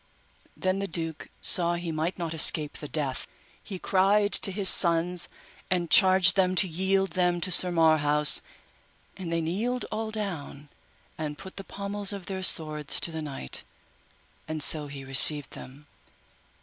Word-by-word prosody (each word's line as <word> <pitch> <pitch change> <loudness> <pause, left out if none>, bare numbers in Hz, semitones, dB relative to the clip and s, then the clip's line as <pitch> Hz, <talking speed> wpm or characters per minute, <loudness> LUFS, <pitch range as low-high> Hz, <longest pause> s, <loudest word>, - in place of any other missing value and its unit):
Then 185 +1 -2
the 200 - -4
duke 165 -2 -7
saw 175 -1 +4
he 170 -1 -6
might 160 +3 -4
not 170 -2 -5
escape 155 -1 +1
the 150 - -9
death, 140 -4 -4 0.3
he 195 - -9
cried 200 +3 0
to 195 - +7
his 195 0 +3
sons, 175 0 +4 0.4
and 175 -2 -3
charged 185 -2 +5
them 185 -1 0
to 190 - +4
yield 190 +2 -2
them 175 0 -1
to 185 +2 -4
Sir 180 +1 +3
Marhaus; 155 -3 +2 0.7
and 180 -3 -8
they 165 0 -2
kneeled 220 +10 -4
all 220 +1 -5
down 165 -9 -7 0.5
and 150 -1 -6
put 190 +3 -13
the 195 - -7
pommels 200 +1 -5
of 195 -3 -9
their 190 0 -7
swords 155 -5 0
to 170 - -2
the 160 0 -7
knight, 140 - -5 0.8
and 155 -1 -3
so 150 -2 +3
he 140 -1 -10
received 135 +2 +3
them. 140 +3 -13
175 Hz, 160 wpm, -25 LUFS, 155-190 Hz, 0.8 s, to